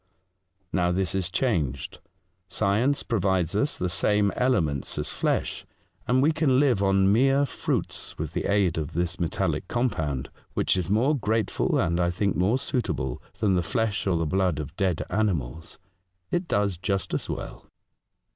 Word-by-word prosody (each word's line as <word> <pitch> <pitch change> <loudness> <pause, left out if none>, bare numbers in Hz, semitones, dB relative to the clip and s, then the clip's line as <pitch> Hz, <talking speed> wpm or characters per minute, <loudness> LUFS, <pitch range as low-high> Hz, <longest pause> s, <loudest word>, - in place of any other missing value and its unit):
Now 90 -2 +2
this 90 -1 0
is 95 -2 0
changed. 85 - -1 0.5
Science 110 +9 +1
pro 115 -3 -1
vides 95 -2 +1
us 140 +8 +1
the 90 - -1
same 100 +2 +2
elements 80 - 0
as - - -1
flesh, - - -1 0.4
and 130 +2 +3
we 155 - +4
can 145 -5 +2
live 130 -8 +3
on 95 0 +4
mere 135 +4 +4
fruits - - -3
with - - -4
the - - -2
aid 100 -5 +2
of 75 - -5
this 90 +2 -1
metallic 85 +1 -1
compound, 80 - -1 0.2
which - - +2
is 90 -2 -2
more 120 +9 +3
grateful, 110 -4 0
and 85 +1 +1
I 85 0 +2
think 100 +3 0
more 95 +8 +2
suitable, 105 - -2 0.2
than 105 -3 +3
the 90 - +2
flesh 110 +3 -1
or 90 -3 +2
the 80 - 0
blood 90 0 +1
of 75 -3 -6
dead 95 -4 0
animals. 80 - -2 0.5
It 175 0 0
does 100 - +1
just 95 +1 -2
as - - -2
well." - - -6
95 Hz, 165 wpm, -26 LUFS, 85-115 Hz, 0.5 s, we